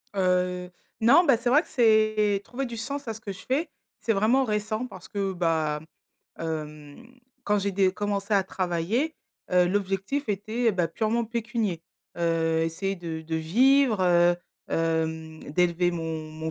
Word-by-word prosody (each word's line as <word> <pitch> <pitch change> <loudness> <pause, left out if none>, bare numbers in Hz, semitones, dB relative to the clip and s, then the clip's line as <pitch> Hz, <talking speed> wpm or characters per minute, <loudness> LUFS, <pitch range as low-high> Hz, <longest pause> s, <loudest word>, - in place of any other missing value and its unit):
Heu, 180 -1 0 0.3
non, 280 +10 +7
bah, 270 -7 +5
c'est 240 +1 -1
vrai 295 +5 +6
que - - -18
c'est 215 -3 +3
trouver 265 +5 -4
du 235 -2 -6
sens 275 +3 -5
à 225 - -2
ce 220 - -11
que 200 - -5
je 195 - -9
fais, 300 +5 0 0.3
c'est 225 - +1
vraiment 225 +7 +3
récent 215 +2 -2
parce 190 -3 -12
que, 195 -2 -2
bah, 160 -4 0 0.6
hem, 155 +3 -6 0.4
quand 210 0 +2
j'ai 200 0 -1
dé 190 -1 +3
commencé 205 +1 -1
à 195 - +4
travailler, 190 - -1 0.4
heu, 180 -1 +4
l'objectif 195 +8 -1
était, 215 +3 0
bah, 175 -3 0
purement 225 +4 0
pécunier. 225 -6 -2 0.4
Heu, 165 -1 +1
essayer 195 +4 -2
de 165 -2 -5
de 160 0 -3
vivre, 240 - +3
heu, 175 -1 +4 0.3
hem, 160 -1 -1
d'élever 175 +1 +2
mon 160 -2 -4
mon 160 +1 -5
195 Hz, 160 wpm, -26 LUFS, 165-225 Hz, 0.6 s, non